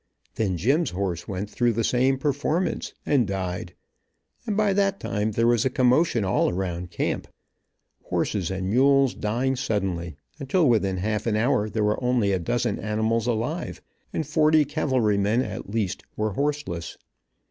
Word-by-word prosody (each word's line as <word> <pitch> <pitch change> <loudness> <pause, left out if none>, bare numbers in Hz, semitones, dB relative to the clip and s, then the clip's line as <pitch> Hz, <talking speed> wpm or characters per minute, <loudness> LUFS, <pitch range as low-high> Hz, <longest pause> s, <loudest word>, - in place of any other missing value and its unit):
Then 95 -5 -1
Jim's 140 - +2
horse 90 -2 -3
went 100 0 -3
through 120 +3 +1
the 115 +1 0
same 130 +3 +2
performance 150 +5 -1
and 130 -7 +2
died, 95 -2 -4 0.7
and 210 -2 -1
by 210 -2 +3
that 195 -1 +1
time 105 +1 -2
there 115 +2 +2
was 120 -2 +3
a 130 - +2
commotion 125 -2 +2
all 95 - +2
around 90 -1 -3
camp, - - -2 0.8
horses 95 -5 -1
and 95 0 -2
mules 135 +2 +4
dying 120 +5 -1
suddenly, 95 - -2 0.2
until 150 +4 +2
within 100 -6 +2
half 105 +4 -2
an 110 - +1
hour 110 -1 +1
there 105 +1 -1
were 105 +4 0
only 125 -5 +2
a 95 - +1
dozen 120 +5 -1
animals 110 +2 0
alive, 120 +9 -2 0.3
and 160 - -2
forty 155 0 +4
cavalrymen, 115 -5 +1
at 105 -4 -6
least, 100 -4 -2
were 110 0 -1
horseless. 140 - -3
115 Hz, 155 wpm, -25 LUFS, 100-135 Hz, 0.8 s, mules